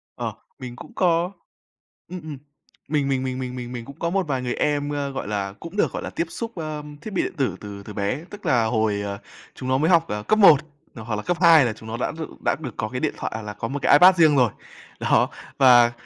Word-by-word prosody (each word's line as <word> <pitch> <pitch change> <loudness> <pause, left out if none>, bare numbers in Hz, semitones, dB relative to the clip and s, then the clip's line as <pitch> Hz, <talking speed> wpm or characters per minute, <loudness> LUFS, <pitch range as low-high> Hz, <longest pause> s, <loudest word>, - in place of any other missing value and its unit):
Ờ, - - -4 0.3
mình 125 -1 -7
cũng - - -12
có, 175 0 +2 0.8
ừm, 180 -1 -6
ừm, 155 -2 -7 0.5
mình 145 -3 +1
mình 130 -1 0
mình 130 0 -3 0.2
mình 125 -1 -6
mình 120 -1 -6
cũng 140 - -12
có 170 - -1
một 190 -2 0
vài 130 -3 -1
người 125 -1 -2
em, 145 -1 0
ơ, 140 -1 -2
gọi 135 - -5
là, 100 -2 -2
cũng 170 +5 -9
được, - - +2
gọi - - -4
là, - - -4
tiếp 170 - -2
xúc, 230 +4 -6
ơ, 155 -2 -4 0.2
thiết 215 - -7
bị - - +1
điện - - -4
tử 130 -10 0
từ 100 -1 -8
từ 105 - -9
bé, 105 +10 -2
tức 205 0 -10
là 120 -3 +3
hồi, 110 -2 0
ờ, 100 0 -4 0.4
chúng 130 - -5
nó 130 - +3
mới 155 +4 +2
học, 170 -2 +5
ờ, 105 0 -4
cấp 215 - +2
1, 175 -8 +9 0.4
ờ, 110 - -8
hoặc 110 -1 -3
là 105 - -3
cấp 175 -1 -1
2 165 -6 +7
là 115 - -1
chúng 110 +1 -12
nó 115 - -4
đã 125 - -1
đ 165 - -9 0.2
đã - - +3
được 130 -7 -6
có 110 - -2
cái 125 - -4
điện - - -1
thoại - - -4
hoặc 110 - -4
là 105 - -6
có 115 - -4
một 140 +3 -4
cái - - +4
iPad 180 +5 +8
riêng 155 -3 +5
rồi. 125 -5 +4 0.5
Đó, - - +3 0.3
và 120 -3 +7
130 Hz, 265 wpm, -23 LUFS, 115-160 Hz, 0.8 s, 1